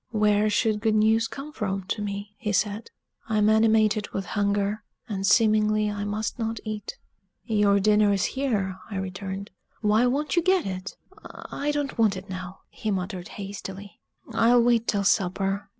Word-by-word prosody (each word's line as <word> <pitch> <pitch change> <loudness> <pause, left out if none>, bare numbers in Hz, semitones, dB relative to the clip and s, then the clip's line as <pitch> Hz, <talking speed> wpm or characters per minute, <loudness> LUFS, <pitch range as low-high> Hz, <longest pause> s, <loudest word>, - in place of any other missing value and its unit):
"Where 210 -1 +2
should 215 0 +1
good 220 -1 +2
news 220 +1 +3
come 280 +5 -8
from 195 -7 -3
to 210 - -1
me?" 200 0 -5
he 210 -3 -2
said. 205 +3 -1 0.4
"I'm 215 -1 +3
animated 220 -1 +3
with 195 - -4
hunger; 205 +1 -1 0.2
and 195 -3 -2
seemingly 215 -1 +3
I 205 0 -4
must 215 +4 -3
not 225 -1 -2
eat." 215 -2 -5 0.5
"Your 205 -3 +3
dinner 210 0 +4
is 195 -2 +1
here," 210 -9 -1
I 205 - -6
returned: 190 +1 -5 0.3
"why 215 +3 +3
won't 290 +6 0
you 345 - +4
get 370 +1 +2
it?" 185 0 -5 0.5
"I 290 - -2
don't 290 -4 -2
want 210 -4 +3
it 190 +1 -9
now," 185 0 -7
he 215 - -5
muttered 185 -2 -3
hastily. 200 0 -8 0.3
"I'll 235 +1 +4
wait 235 -1 +2
till 200 -1 +1
supper. 195 0 0
210 Hz, 165 wpm, -26 LUFS, 200-220 Hz, 0.5 s, dinner